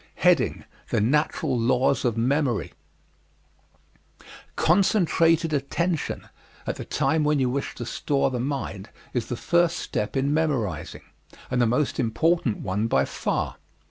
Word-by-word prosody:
The - - +1
Natural 145 +4 +1
Laws 130 +3 +2
of 115 -2 0
Memory 130 0 0 1.8
Concentrated 165 -3 +3
attention 155 +4 -1 0.4
at - - -3
the - - -6
time 160 -1 +1
when 150 0 +2
you 130 -2 +1
wish 140 +2 -3
to 120 - -6
store 135 +2 0
the 125 - -2
mind 120 -7 -4 0.2
is 120 -2 -1
the 120 - -4
first 170 +3 +2
step 105 +6 -3
in 140 +2 +1
memorizing 125 - -1 0.5
and 125 -1 +2
the 120 - +4
most 125 +5 0
important 135 +1 +1
one 100 +4 -1
by - - +2
far. - - -2
135 Hz, 130 wpm, -25 LUFS, 120-155 Hz, 1.8 s, the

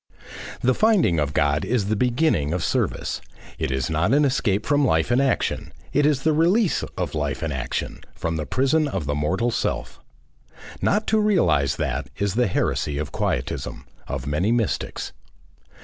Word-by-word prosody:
The 130 +1 +3
finding 180 - +3
of 75 -1 0
God 75 +1 +1
is 120 -5 0
the 110 +2 0
beginning 120 - +1
of 90 -2 -1
service. - - -1 0.4
It - - -1
is 65 -1 -1
not 80 - +2
an 150 0 +4
escape 110 -7 +1
from 145 0 +2
life 80 -5 +2
and 125 +2 +4
action; 135 -2 0 0.2
it 145 +1 +4
is 140 -3 +1
the 160 - +3
release 175 +6 +3 0.2
of - - -2
life 75 0 -2
and 80 -2 -2
action 65 -2 -3 0.2
from 85 0 -2
the 75 -2 -3
prison 135 - +2
of 95 - -3
the 75 - -1
mortal 95 +11 0
self. - - -2 0.8
Not 210 +2 +2
to 220 - +2
realise 85 - +2
that, - - -2
is 100 -2 0
the 120 +1 +2
heresy 75 -5 -1
of 75 0 -3
Quietism, 65 - -3 0.2
of - - -4
many 75 +9 0
mystics. 115 -3 -1
105 Hz, 170 wpm, -23 LUFS, -, 0.8 s, an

